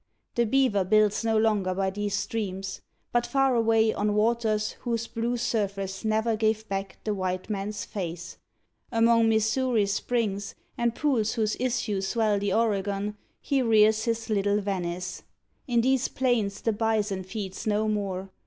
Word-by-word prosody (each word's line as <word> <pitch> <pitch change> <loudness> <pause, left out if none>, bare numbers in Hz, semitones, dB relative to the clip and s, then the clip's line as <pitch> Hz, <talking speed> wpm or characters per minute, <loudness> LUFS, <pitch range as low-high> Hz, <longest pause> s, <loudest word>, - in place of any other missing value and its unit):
The 235 -1 +1
beaver 240 -5 +3
builds 210 +2 +3
No 225 -1 +2
longer 210 -4 +2
by 190 0 0
these 205 0 -2
streams, 195 -2 -3 0.3
but 240 0 +1
far 270 +1 +2
away, 225 -1 +3
On 205 0 0
waters 215 -1 +1
whose 230 -1 -2
blue 235 +1 -2
surface 200 -4 -2
ne'er 220 +1 +1
gave 220 0 0
back 195 0 -4
The 215 - -1
white 185 0 -3
man's 205 0 -3
face 175 -2 -6 0.5
among 230 -1 +4
Missouri's 220 -1 +2
springs, 205 -3 -2 0.2
And 235 -1 0
pools 245 -8 +1
whose 215 -3 0
issues 215 -6 -1
swell 215 -2 +1
the 200 -1 -1
Oregan, 205 -1 0 0.3
He 275 -2 +1
rears 220 -2 +4
his 230 -1 -1
little 205 -1 +1
Venice. 180 -3 -3 0.5
In 240 -2 +3
these 260 +1 +2
plains 225 -6 0
The 225 - +1
bison 210 -3 0
feeds 190 +1 -6
no 215 +1 +1
more. 195 -3 -2
215 Hz, 150 wpm, -27 LUFS, 200-230 Hz, 0.5 s, among